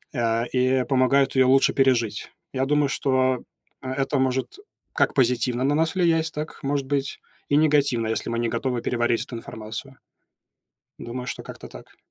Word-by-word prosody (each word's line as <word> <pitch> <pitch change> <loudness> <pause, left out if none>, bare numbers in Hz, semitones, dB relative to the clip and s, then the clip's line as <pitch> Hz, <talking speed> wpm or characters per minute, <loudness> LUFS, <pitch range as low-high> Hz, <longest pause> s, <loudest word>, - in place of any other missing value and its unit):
а, 115 -1 +1
и 130 +1 +1
помогают 135 +1 +2
её 130 -1 +4
лучше 135 0 +4
пережить. 125 -6 +1 0.2
Я 130 0 0
думаю, 145 0 +2
что, 130 -2 +1 0.4
а, 130 -1 -4
это 135 +1 0
может 130 - -1 0.4
как - - +2
позитивно 125 -1 +1
на 140 +2 +2
нас 160 +3 +1
влиять, 165 -3 +2
так, 150 +1 -6
может 140 0 -1
быть, 140 -1 -2 0.3
и 145 - +3
негативно, 145 -6 +2
если 110 +1 -2
мы 115 0 -1
не 120 -1 0
готовы 120 +1 -2
переварить 120 -1 0
эту 120 - -9
информацию. 110 +4 -8 1.0
Думаю, 125 +1 -6
что - - -5
как-то - - -10
так. - - -14
130 Hz, 165 wpm, -24 LUFS, 120-140 Hz, 1.0 s, её